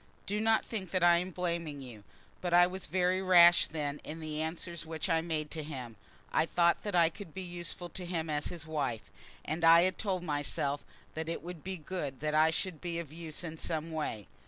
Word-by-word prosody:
Do 210 Hz, +1 st, -1 dB
not 220 Hz, 0 st, +3 dB
think 195 Hz, -6 st, -4 dB
that 185 Hz, 0 st, 0 dB
I 175 Hz, 0 st, +7 dB
am 180 Hz, +2 st, -2 dB
blaming 170 Hz, -4 st, -3 dB
you, 120 Hz, -6 st, -10 dB, 0.4 s
but 175 Hz, -1 st, +1 dB
I 175 Hz, 0 st, +8 dB
was 185 Hz, +1 st, -5 dB
very 185 Hz, +1 st, +2 dB
rash 175 Hz, -2 st, +7 dB
then 150 Hz, -2 st, -3 dB
in 160 Hz, +2 st, -7 dB
the 155 Hz, -1 st, -3 dB
answers 170 Hz, +1 st, -4 dB
which 160 Hz, 0 st, -4 dB
I 165 Hz, 0 st, +3 dB
made 155 Hz, -2 st, -3 dB
to 160 Hz, -, -3 dB
him. 130 Hz, -7 st, -7 dB, 0.4 s
I 160 Hz, -, +3 dB
thought 170 Hz, 0 st, +3 dB
that 205 Hz, -3 st, -3 dB
I 170 Hz, -2 st, +6 dB
could 165 Hz, -1 st, -11 dB
be 190 Hz, -, -4 dB
useful 175 Hz, 0 st, -5 dB
to 180 Hz, -, -6 dB
him 165 Hz, -2 st, -2 dB
as 150 Hz, -1 st, -1 dB
his 170 Hz, -3 st, -6 dB
wife, 145 Hz, -9 st, -3 dB, 0.3 s
and 160 Hz, +2 st, -3 dB
I 165 Hz, +1 st, +8 dB
had 185 Hz, +1 st, 0 dB
told 190 Hz, -4 st, -1 dB
myself 145 Hz, -2 st, -1 dB, 0.3 s
that 160 Hz, +1 st, -4 dB
it 165 Hz, -, -3 dB
would 175 Hz, -2 st, -8 dB
be 190 Hz, 0 st, -4 dB
good 150 Hz, -5 st, -5 dB
that 150 Hz, +1 st, -1 dB
I 155 Hz, +1 st, +5 dB
should 165 Hz, 0 st, -2 dB
be 170 Hz, -2 st, -3 dB
of 160 Hz, -3 st, -6 dB
use 165 Hz, 0 st, -4 dB
in 160 Hz, -2 st, -6 dB
some 160 Hz, 0 st, -3 dB
way. 150 Hz, -10 st, -3 dB
165 Hz, 220 wpm, -32 LUFS, 155-180 Hz, 0.4 s, I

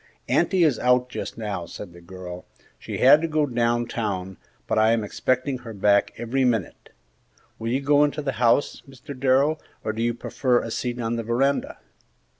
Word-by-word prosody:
"Auntie 185 Hz, -3 st, +2 dB
is 145 Hz, -8 st, +2 dB
out 125 Hz, 0 st, +2 dB
just -, -, -6 dB
now," 100 Hz, -6 st, -4 dB
said 90 Hz, -4 st, -9 dB
the 85 Hz, -, -14 dB
girl; 90 Hz, 0 st, -9 dB, 0.3 s
"she -, -, -6 dB
had 140 Hz, +4 st, +7 dB
to 165 Hz, -, 0 dB
go 155 Hz, -1 st, +1 dB
down 120 Hz, -2 st, 0 dB
town, 95 Hz, -6 st, -4 dB, 0.3 s
but 110 Hz, -, 0 dB
I 110 Hz, +1 st, +4 dB
am 115 Hz, -2 st, 0 dB
expecting 130 Hz, +5 st, -1 dB
her 115 Hz, -2 st, -9 dB
back 100 Hz, +1 st, +3 dB
every 125 Hz, +3 st, -1 dB
minute. 115 Hz, -7 st, -1 dB, 0.7 s
Will 115 Hz, +1 st, -3 dB
you 130 Hz, +3 st, 0 dB
go 145 Hz, +1 st, +4 dB
into 150 Hz, 0 st, -1 dB
the 135 Hz, -, -1 dB
house, 120 Hz, +4 st, +2 dB
Mr. 135 Hz, +1 st, -10 dB
Darrell, 135 Hz, +4 st, +2 dB, 0.2 s
or 110 Hz, -, -2 dB
do 110 Hz, -, -4 dB
you 120 Hz, 0 st, 0 dB
prefer 125 Hz, +1 st, 0 dB
a 115 Hz, -, -5 dB
seat 120 Hz, +1 st, -3 dB
on 115 Hz, 0 st, -2 dB
the 115 Hz, -, -3 dB
veranda?" 135 Hz, +5 st, 0 dB
120 Hz, 190 wpm, -24 LUFS, 110-135 Hz, 0.7 s, had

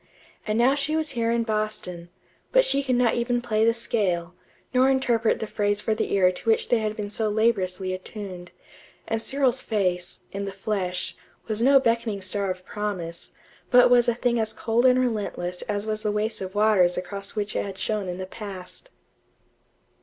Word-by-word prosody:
And 215 Hz, +1 st, 0 dB
now 245 Hz, +3 st, +4 dB
she 285 Hz, +2 st, 0 dB
was 315 Hz, -2 st, 0 dB
here 230 Hz, -3 st, 0 dB
in 235 Hz, 0 st, +1 dB
Boston, 215 Hz, -6 st, -3 dB, 0.4 s
but -, -, +5 dB
she 280 Hz, -, +2 dB
could 260 Hz, -2 st, 0 dB
not 245 Hz, -2 st, +3 dB
even 240 Hz, 0 st, 0 dB
play 220 Hz, -3 st, 0 dB
the 230 Hz, -, +5 dB
scale, 185 Hz, -7 st, -1 dB, 0.4 s
nor 255 Hz, +1 st, +4 dB
interpret 240 Hz, -4 st, +2 dB
the -, -, -4 dB
phrase 205 Hz, -1 st, 0 dB
for 220 Hz, -, +1 dB
the 215 Hz, -, -2 dB
ear 185 Hz, -2 st, +5 dB
to 185 Hz, +5 st, -5 dB
which 225 Hz, -, +3 dB
they 240 Hz, -, +3 dB
had 215 Hz, -1 st, -2 dB
been 205 Hz, -1 st, -4 dB
so 215 Hz, 0 st, -1 dB
laboriously 195 Hz, -4 st, 0 dB
attuned; 185 Hz, -2 st, -7 dB, 0.6 s
and 225 Hz, 0 st, -1 dB
Cyril's 265 Hz, -1 st, +1 dB
face, 180 Hz, -5 st, -1 dB
in 200 Hz, 0 st, -4 dB
the 195 Hz, -, -4 dB
flesh, 190 Hz, -2 st, -3 dB, 0.3 s
was 220 Hz, 0 st, -2 dB
no 275 Hz, +3 st, +6 dB
beckoning 230 Hz, -5 st, 0 dB
star 195 Hz, +1 st, -1 dB
of 185 Hz, 0 st, -5 dB
promise, 185 Hz, -5 st, -5 dB, 0.4 s
but 245 Hz, 0 st, +6 dB
was 245 Hz, 0 st, +5 dB
a 240 Hz, -, +2 dB
thing 240 Hz, -1 st, +1 dB
as 220 Hz, -1 st, -1 dB
cold 235 Hz, +3 st, +2 dB
and 250 Hz, 0 st, +5 dB
relentless 205 Hz, -7 st, -2 dB
as 205 Hz, 0 st, -1 dB
was 215 Hz, 0 st, -2 dB
the 210 Hz, -1 st, 0 dB
waste 210 Hz, +1 st, -1 dB
of 190 Hz, +1 st, -6 dB
waters 205 Hz, -4 st, +4 dB
across 195 Hz, +4 st, -4 dB
which 210 Hz, -1 st, -2 dB
it -, -, 0 dB
had 195 Hz, -1 st, -7 dB
shone 210 Hz, -3 st, -1 dB
in 180 Hz, -, -4 dB
the 185 Hz, -, -4 dB
past. 195 Hz, -, -8 dB
215 Hz, 190 wpm, -25 LUFS, 190-235 Hz, 0.6 s, no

